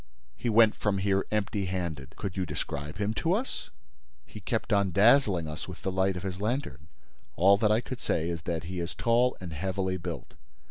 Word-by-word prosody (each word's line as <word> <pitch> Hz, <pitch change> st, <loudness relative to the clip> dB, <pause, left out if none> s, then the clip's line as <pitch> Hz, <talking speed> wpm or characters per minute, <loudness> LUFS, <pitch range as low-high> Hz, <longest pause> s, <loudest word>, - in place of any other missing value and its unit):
"He 120 Hz, -, -2 dB
went 110 Hz, -1 st, +6 dB
from 105 Hz, -2 st, 0 dB
here 95 Hz, 0 st, +1 dB
empty 105 Hz, -1 st, -1 dB
handed." 85 Hz, -7 st, -4 dB
"Could 95 Hz, -3 st, -5 dB
you 95 Hz, -, 0 dB
describe 75 Hz, -2 st, -4 dB
him 105 Hz, +1 st, 0 dB
to 165 Hz, +9 st, +1 dB
us?" 240 Hz, +7 st, -3 dB, 0.6 s
"He -, -, -10 dB
kept -, -, -1 dB
on 100 Hz, -1 st, +3 dB
dazzling 100 Hz, -, +4 dB
us 75 Hz, +1 st, -6 dB
with 90 Hz, -, -9 dB
the 95 Hz, -, -1 dB
light 95 Hz, 0 st, +1 dB
of 90 Hz, -, -6 dB
his 95 Hz, -1 st, -4 dB
lantern. 110 Hz, -, -2 dB, 0.5 s
All 95 Hz, +6 st, +6 dB
that 105 Hz, -1 st, +3 dB
I 110 Hz, +2 st, +3 dB
could 130 Hz, 0 st, -6 dB
say 80 Hz, 0 st, 0 dB
is 85 Hz, -2 st, -3 dB
that 80 Hz, -2 st, -1 dB
he 90 Hz, +2 st, -5 dB
is 85 Hz, 0 st, -4 dB
tall 120 Hz, +2 st, +2 dB
and 90 Hz, -3 st, -7 dB
heavily 95 Hz, +3 st, -1 dB
built." 85 Hz, -, -6 dB
95 Hz, 200 wpm, -29 LUFS, 85-105 Hz, 0.6 s, went